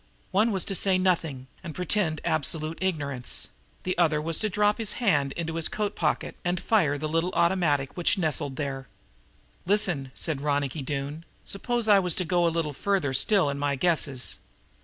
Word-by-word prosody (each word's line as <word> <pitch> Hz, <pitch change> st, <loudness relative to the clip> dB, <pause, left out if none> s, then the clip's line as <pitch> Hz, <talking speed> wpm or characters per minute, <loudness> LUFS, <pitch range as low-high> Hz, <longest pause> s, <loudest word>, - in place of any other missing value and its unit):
One 215 Hz, +4 st, +3 dB
was 190 Hz, -3 st, 0 dB
to 195 Hz, -, -1 dB
say 190 Hz, 0 st, +3 dB
nothing 165 Hz, -8 st, 0 dB, 0.2 s
and 170 Hz, -4 st, -7 dB
pretend 180 Hz, -3 st, 0 dB
absolute 155 Hz, +1 st, -1 dB
ignorance; 145 Hz, -9 st, -2 dB, 0.3 s
the 185 Hz, -, -1 dB
other 155 Hz, -3 st, +3 dB
was 160 Hz, +1 st, +1 dB
to 215 Hz, -, 0 dB
drop 210 Hz, +2 st, +2 dB
his 220 Hz, -3 st, 0 dB
hand 145 Hz, -, +1 dB
into 165 Hz, -1 st, -4 dB
his 165 Hz, -, +2 dB
coat 210 Hz, -1 st, -2 dB
pocket 155 Hz, -3 st, -1 dB
and 175 Hz, 0 st, 0 dB
fire 165 Hz, -11 st, +2 dB
the 155 Hz, +2 st, -3 dB
little 165 Hz, +3 st, +1 dB
automatic 160 Hz, -6 st, +1 dB
which 175 Hz, +3 st, +2 dB
nestled 155 Hz, -5 st, 0 dB
there. 135 Hz, -3 st, -4 dB, 0.8 s
"Listen," 175 Hz, -10 st, 0 dB
said 155 Hz, -5 st, -2 dB
Ronicky 145 Hz, 0 st, -1 dB
Doone, 140 Hz, +3 st, -4 dB, 0.2 s
"suppose 235 Hz, +3 st, -2 dB
I 205 Hz, -2 st, +7 dB
was 180 Hz, -3 st, +2 dB
to 185 Hz, -, -1 dB
go 175 Hz, 0 st, +2 dB
a -, -, +4 dB
little 165 Hz, -3 st, -2 dB
farther 185 Hz, -4 st, 0 dB
still 185 Hz, +5 st, +3 dB
in 140 Hz, 0 st, -2 dB
my 145 Hz, 0 st, 0 dB
guesses! 140 Hz, -4 st, +1 dB
165 Hz, 180 wpm, -27 LUFS, 145-190 Hz, 0.8 s, I